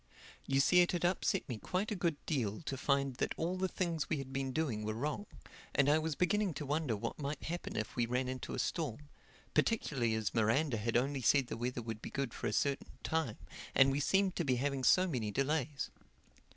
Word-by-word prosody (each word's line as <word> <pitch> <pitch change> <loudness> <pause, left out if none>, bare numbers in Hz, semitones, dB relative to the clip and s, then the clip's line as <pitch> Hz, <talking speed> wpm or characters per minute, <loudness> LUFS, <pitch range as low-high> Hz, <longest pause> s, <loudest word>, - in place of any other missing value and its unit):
You 135 0 +2
see 180 +6 +6
it 175 - +2
had 175 -1 0
upset 190 +2 +1
me 120 -6 -4
quite 190 - -2
a - - 0
good 170 -4 +1
deal 115 -7 -1
to 140 - -3
find 140 -1 +1
that - - -1
all 170 +3 -1
the 190 0 0
things 170 -4 -2
we 155 - +1
had 135 -1 -6
been 135 -1 -1
doing 130 -8 -1
were 110 0 -2
wrong; 150 - -2 0.5
and 140 - +4
I 150 +2 +5
was 160 -1 -2
beginning 195 0 +1
to 150 - -4
wonder 145 -4 0
what 105 - -4
might 145 0 -3
happen 175 +2 -4
if 110 - -3
we 120 -1 +1
ran 125 +2 0
into 130 0 -4
a - - -5
storm—particularly 145 - -1
as 110 -2 -1
Miranda 120 +4 +2
had 115 +2 +1
only 135 +2 0
said 135 +3 +4
the - - -3
weather 120 +1 -3
would 110 -1 -5
be - - -6
good 135 -4 -2
for - - -3
a - - 0
certain 140 +3 0
time; 160 -9 -1 0.4
and 135 0 +6
we 140 - 0
seemed 195 +5 +2
to 175 - +1
be 130 -4 +2
having 135 +1 -1
so 185 +7 +6
many 120 - -1
delays. 140 +2 -1
140 Hz, 215 wpm, -34 LUFS, 125-160 Hz, 0.5 s, see